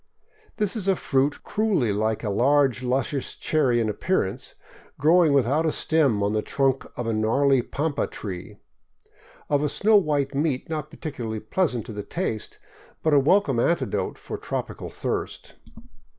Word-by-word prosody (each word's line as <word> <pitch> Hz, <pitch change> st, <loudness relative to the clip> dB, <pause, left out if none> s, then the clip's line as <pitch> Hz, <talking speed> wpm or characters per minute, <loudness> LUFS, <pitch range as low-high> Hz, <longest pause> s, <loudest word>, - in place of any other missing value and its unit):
This 210 Hz, 0 st, +1 dB
is 200 Hz, -4 st, -3 dB
a 195 Hz, -, +4 dB
fruit 140 Hz, -2 st, 0 dB
cruelly 195 Hz, -, +1 dB
like 110 Hz, +2 st, -1 dB
a 105 Hz, -, -1 dB
large 135 Hz, +3 st, +3 dB
luscious 130 Hz, +2 st, -1 dB
cherry 135 Hz, -6 st, +1 dB
in 115 Hz, -, +1 dB
appearance, 105 Hz, -, -1 dB, 0.4 s
grow 165 Hz, +5 st, +5 dB
ing 155 Hz, -, +3 dB
without 140 Hz, +3 st, +2 dB
a 160 Hz, -, +1 dB
stem 140 Hz, -13 st, +1 dB
on 100 Hz, +1 st, 0 dB
the 110 Hz, -, +1 dB
trunk 135 Hz, +3 st, 0 dB
of 120 Hz, -, -3 dB
a 115 Hz, -, 0 dB
gnarly 130 Hz, +5 st, +3 dB
pampa 145 Hz, +4 st, -2 dB
tree, 90 Hz, -4 st, -7 dB, 0.9 s
of 145 Hz, -1 st, +1 dB
a 150 Hz, -, +1 dB
snow 210 Hz, +9 st, +4 dB
white 145 Hz, -7 st, 0 dB
meat 140 Hz, -2 st, -1 dB
not 155 Hz, -1 st, -3 dB
particularly 120 Hz, -10 st, -5 dB
pleasant 125 Hz, -, -1 dB
to 110 Hz, -, -8 dB
the 105 Hz, -, -4 dB
taste, 110 Hz, -, -4 dB, 0.5 s
but 155 Hz, -, +2 dB
a 145 Hz, -, +7 dB
welcome 140 Hz, -3 st, +3 dB
antidote 170 Hz, +8 st, 0 dB
for -, -, -7 dB
tropical -, -, -5 dB
thirst. -, -, -4 dB
140 Hz, 160 wpm, -25 LUFS, 115-155 Hz, 0.9 s, a